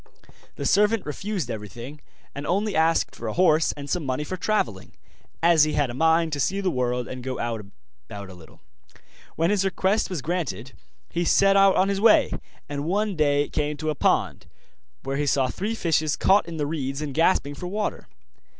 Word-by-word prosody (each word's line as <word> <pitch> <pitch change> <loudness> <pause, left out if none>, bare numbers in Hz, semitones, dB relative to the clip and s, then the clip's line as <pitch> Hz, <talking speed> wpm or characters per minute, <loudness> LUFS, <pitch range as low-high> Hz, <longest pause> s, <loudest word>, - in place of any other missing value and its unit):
The - - -5
servant 210 +1 +3
refused 175 - -4
everything, 115 +7 -8 0.3
and 140 +1 -6
only 200 +3 0
asked 160 +1 +2
for 115 - -6
a 110 - -2
horse 165 -3 +3
and 145 -1 -8
some 170 +4 -1
money 130 +1 -2
for 185 - -5
travelling, 175 - -2 0.5
as 170 -2 +6
he 155 - 0
had 145 -4 0
a - - -7
mind 160 +3 +2
to 145 - -2
see 195 +8 0
the 190 -2 0
world 125 -2 -1
and 130 -1 -7
go 130 0 -3
about 115 -4 -4 0.6
a 95 - -11
little. 85 -3 -16 0.7
When 165 +4 +1
his 205 -2 +2
request 195 +2 0
was 175 -8 -4
granted 135 - -3 0.4
he 175 - -1
set 195 +3 +4
out 195 -1 +5
on 190 - +3
his 200 0 -1
way, 225 -1 +5 0.4
and 145 0 -4
one 200 +3 0
day 145 -2 +2
came 150 0 -2
to 155 0 -2
a - - -4
pond, - - 0 0.6
where 135 0 -3
he 145 0 -1
saw 135 -2 +2
three 210 - -3
fishes 155 -6 +1
caught 195 0 +3
in 165 -1 -6
the 150 - -1
reeds 145 -1 -3
and 145 -2 -5
gasping 160 -2 +2
for 180 +5 -7
water. 210 +3 -3
155 Hz, 195 wpm, -24 LUFS, 135-185 Hz, 0.7 s, as